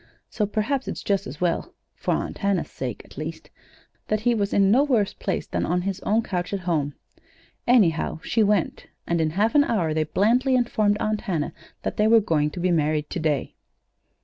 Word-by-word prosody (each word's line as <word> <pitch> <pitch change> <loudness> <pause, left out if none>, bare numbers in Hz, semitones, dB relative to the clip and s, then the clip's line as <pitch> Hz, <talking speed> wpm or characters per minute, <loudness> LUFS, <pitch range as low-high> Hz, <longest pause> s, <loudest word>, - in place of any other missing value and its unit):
So 210 - 0
perhaps 230 +6 -1
it's - - -5
just 200 -1 0
as 130 +4 -8
well 175 -2 -1 0.2
for - - -1
Aunt - - -4
Hannah's 200 -3 0
sake, 125 -5 -5
at - - -12
least 160 +1 -7 0.6
that 215 0 0
he 240 +2 +3
was 205 -3 0
in 195 -1 +4
no 260 +6 +5
worse 235 -9 +1
place - - -3
than - - -2
on 180 +1 0
his 195 0 -2
own 220 +3 +1
couch 180 -1 -3
at 195 - -2
home. 155 -5 -1 0.7
Anyhow, 190 -11 +3
she 225 - +1
went, 205 -4 +1 0.2
and 170 -1 0
in 160 - +2
half 205 +8 +1
an 290 - +6
hour 175 - 0
they 155 0 +1
blandly 235 - +2
informed 215 -4 +2
Aunt 215 -1 -1
Hannah 170 -9 -2 0.3
that - - -3
they 210 - +3
were 225 +1 +7
going 160 -8 +1
to 175 - -8
be 180 +1 +1
married 155 -2 0
to - - -2
day. 150 -4 -1
195 Hz, 200 wpm, -24 LUFS, 160-215 Hz, 0.7 s, were